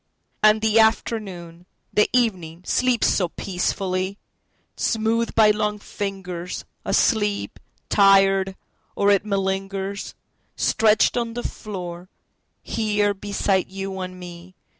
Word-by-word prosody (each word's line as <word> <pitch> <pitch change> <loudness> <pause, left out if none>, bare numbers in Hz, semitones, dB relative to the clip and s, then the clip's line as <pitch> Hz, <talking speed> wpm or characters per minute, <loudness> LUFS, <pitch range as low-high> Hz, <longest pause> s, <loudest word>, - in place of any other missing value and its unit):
……..And 215 0 +5
the 220 0 +4
afternoon, 190 -6 0 0.3
the 210 - +3
evening, 185 -9 0
sleeps 250 -2 +2
so 180 -3 +2
peacefully! 185 +1 -2 0.6
Smoothed 225 +1 0
by 215 -1 +6
long 210 0 -1
fingers, 190 -4 -5 0.2
Asleep… 210 -4 +1 0.3
tired… 195 -1 +4 0.4
or 200 0 +3
it 200 0 +2
malingers, 195 0 -2 0.4
Stretched 220 +2 +3
on 235 -1 -2
the 240 - -4
floor, 180 -4 -7 0.5
here 210 -2 0
beside 195 -1 -1
you 195 0 -5
and 185 0 -6
me. 175 +1 -11
195 Hz, 105 wpm, -23 LUFS, 185-215 Hz, 0.6 s, by